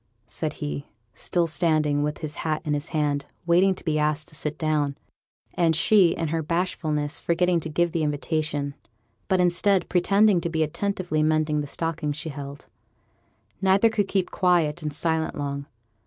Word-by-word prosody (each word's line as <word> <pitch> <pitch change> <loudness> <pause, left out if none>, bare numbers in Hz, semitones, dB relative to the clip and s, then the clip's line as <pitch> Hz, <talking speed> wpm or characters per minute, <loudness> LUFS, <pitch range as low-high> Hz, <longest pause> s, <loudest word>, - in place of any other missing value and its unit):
said 150 +8 -3
he, 145 -1 -5 0.3
still 175 -1 0
standing, 155 -2 +2
with 150 0 -1
his 150 -1 -2
hat 155 -1 -1
in 150 - 0
his 145 +2 -3
hand, 145 -3 -1 0.2
waiting 180 +3 +4
to - - -11
be 155 -2 +1
asked 150 +1 0
to 175 - -11
sit 150 0 -3
down; 150 -3 0 0.6
and 165 -2 +2
she, 195 +3 +5
in 165 -1 -1
her 165 +1 0
bashfulness, 155 -2 -1
forgetting 175 +1 +2
to 160 - -4
give 170 +2 +1
the 165 - -1
invitation, 150 -1 -1 0.5
but, 190 - +2
instead, 180 +2 +3
pretending 195 +1 +4
to 170 - -2
be 160 -1 +1
attentively 175 0 -1
mending 155 -1 +2
the 145 - -5
stocking 165 0 -2
she 155 +2 -5
held. 140 0 -8 1.0
Neither 195 +4 +4
could 205 -3 0
keep 190 -2 -1
quiet 175 -3 +2
and 150 -1 -3
silent 160 +2 -1
long. 140 -1 -4
155 Hz, 170 wpm, -25 LUFS, 150-175 Hz, 1.0 s, she